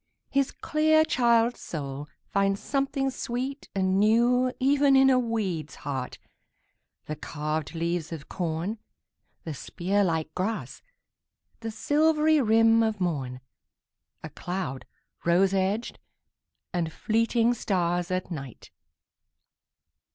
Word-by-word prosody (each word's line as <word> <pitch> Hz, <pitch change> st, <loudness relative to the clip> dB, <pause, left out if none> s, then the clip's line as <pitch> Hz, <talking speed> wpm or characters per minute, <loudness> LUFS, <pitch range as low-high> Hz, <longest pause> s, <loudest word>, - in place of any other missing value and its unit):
His 275 Hz, -1 st, +2 dB
clear 315 Hz, +1 st, +2 dB
child's 235 Hz, -3 st, +3 dB
soul 145 Hz, -2 st, -5 dB, 0.2 s
finds 195 Hz, 0 st, +1 dB
something 270 Hz, +2 st, -1 dB
sweet 260 Hz, +3 st, -4 dB
and 190 Hz, 0 st, +2 dB
newEven 255 Hz, +5 st, +3 dB
in 265 Hz, 0 st, +6 dB
a 255 Hz, -, +4 dB
weed's 200 Hz, -, -2 dB
heart, 135 Hz, -3 st, -5 dB, 0.9 s
the 155 Hz, -, -4 dB
carved 155 Hz, +1 st, -4 dB
leaves 170 Hz, 0 st, -2 dB
of 155 Hz, -3 st, -7 dB
corn, 175 Hz, +4 st, -3 dB, 0.6 s
The 160 Hz, -, -5 dB
spear 190 Hz, +8 st, -1 dB
like 160 Hz, -3 st, -1 dB
grass, 210 Hz, +5 st, -3 dB, 0.8 s
the 225 Hz, -, -4 dB
silvery 305 Hz, +6 st, +3 dB
rim 225 Hz, 0 st, +5 dB
of 220 Hz, -2 st, 0 dB
morn,A 130 Hz, -8 st, -7 dB
cloud 175 Hz, -8 st, -5 dB, 0.4 s
rose 185 Hz, +3 st, +3 dB
edged, 195 Hz, +4 st, -1 dB, 0.7 s
and 170 Hz, -2 st, -1 dB
fleeting 230 Hz, +4 st, +1 dB
stars 175 Hz, -5 st, 0 dB
at 185 Hz, 0 st, -2 dB
night! 135 Hz, -7 st, -8 dB
200 Hz, 105 wpm, -27 LUFS, 165-245 Hz, 0.9 s, in